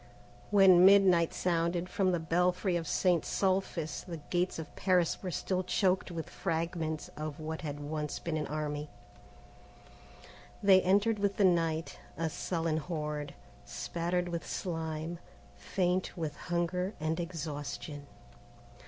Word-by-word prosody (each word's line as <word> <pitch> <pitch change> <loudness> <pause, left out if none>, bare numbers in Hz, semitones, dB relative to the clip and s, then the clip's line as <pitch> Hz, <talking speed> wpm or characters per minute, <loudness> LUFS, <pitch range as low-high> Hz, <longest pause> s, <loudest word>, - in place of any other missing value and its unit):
IV - - -24
When 190 -3 +7
midnight 190 -4 +6
sounded 170 0 0
from 185 0 +1
the 175 - +1
belfry 180 +3 +1
of 165 -2 -2
St. 175 -3 +2
Sulpice 185 -5 -1
the 170 -2 -6
gates 175 +4 -1
of 160 -2 -8
Paris 180 -3 +2
were 185 - -3
still 185 +1 -1
choked 185 0 +1
with 165 -2 -5
fragments 165 -2 -2
of 155 -1 -5
what 155 0 -4
had 145 -3 -5
once 150 0 -3
been 165 -2 -3
an 155 - -2
army. 150 0 -3 1.7
They 190 -1 +7
entered 205 +4 +3
with 200 -1 0
the 200 - +4
night, 165 -2 +1 0.2
a 165 -1 -1
sullen 165 -2 -1
horde, 150 -3 -4 0.3
spattered 175 +1 -2
with 170 -1 -3
slime, 160 -1 -4 0.4
faint 185 0 -1
with 155 -3 -3
hunger 180 +3 -2
and 160 +2 -1
exhaustion. 150 -3 -5
170 Hz, 135 wpm, -31 LUFS, 155-185 Hz, 1.7 s, When